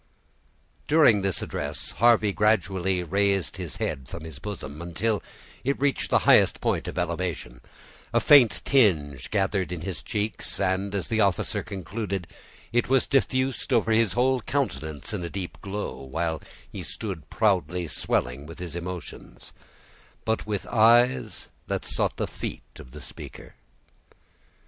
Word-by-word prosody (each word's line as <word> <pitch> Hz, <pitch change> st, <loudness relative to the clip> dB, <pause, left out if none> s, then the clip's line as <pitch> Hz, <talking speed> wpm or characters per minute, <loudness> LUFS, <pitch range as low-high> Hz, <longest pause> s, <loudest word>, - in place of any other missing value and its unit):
During 145 Hz, -10 st, +5 dB
this 95 Hz, -1 st, -1 dB
address, -, -, -4 dB
Harvey 110 Hz, -3 st, +4 dB
gradually 95 Hz, -3 st, +1 dB
raised 100 Hz, +1 st, +1 dB
his 90 Hz, -4 st, -5 dB
head 65 Hz, -1 st, -3 dB
from 85 Hz, -, -7 dB
his 80 Hz, -5 st, -9 dB
bosom, 80 Hz, -7 st, -6 dB
until 95 Hz, +6 st, -1 dB, 0.4 s
it 140 Hz, +2 st, 0 dB
reached 140 Hz, 0 st, 0 dB
the -, -, +5 dB
highest -, -, +5 dB
point -, -, 0 dB
of -, -, -6 dB
elevation; 90 Hz, -1 st, -3 dB, 0.5 s
a -, -, +3 dB
faint 135 Hz, -7 st, +6 dB
tinge 75 Hz, -, +2 dB
gathered 95 Hz, -2 st, 0 dB
in 90 Hz, -3 st, -4 dB
his 85 Hz, -2 st, -4 dB
cheeks, 105 Hz, 0 st, -2 dB
and, 95 Hz, +2 st, 0 dB
as 95 Hz, -5 st, -1 dB
the 110 Hz, -1 st, +1 dB
officer 100 Hz, -4 st, +1 dB
concluded, 100 Hz, -1 st, -4 dB, 0.5 s
it 120 Hz, +1 st, +2 dB
was 135 Hz, -1 st, +4 dB
diffused 130 Hz, 0 st, 0 dB
over 115 Hz, -3 st, +3 dB
his 110 Hz, -3 st, +3 dB
whole 130 Hz, +3 st, +3 dB
countenance 80 Hz, -, -2 dB
in 100 Hz, -4 st, -3 dB
a 85 Hz, -, -4 dB
deep 95 Hz, -1 st, -6 dB
glow, 100 Hz, +1 st, -4 dB
while 80 Hz, +4 st, -2 dB, 0.3 s
he -, -, -6 dB
stood 95 Hz, -8 st, -6 dB
proudly 90 Hz, -5 st, +1 dB
swelling 70 Hz, -1 st, -1 dB
with 80 Hz, -, -10 dB
his 85 Hz, -3 st, -6 dB
emotions, 85 Hz, -1 st, -7 dB, 0.7 s
but 110 Hz, -1 st, -1 dB
with 105 Hz, -2 st, -2 dB
eyes 120 Hz, +3 st, +3 dB, 0.2 s
that -, -, -2 dB
sought -, -, -1 dB
the -, -, 0 dB
feet -, -, -6 dB, 0.2 s
of -, -, -11 dB
the -, -, -10 dB
speaker. -, -, -9 dB
95 Hz, 145 wpm, -26 LUFS, 85-110 Hz, 0.7 s, faint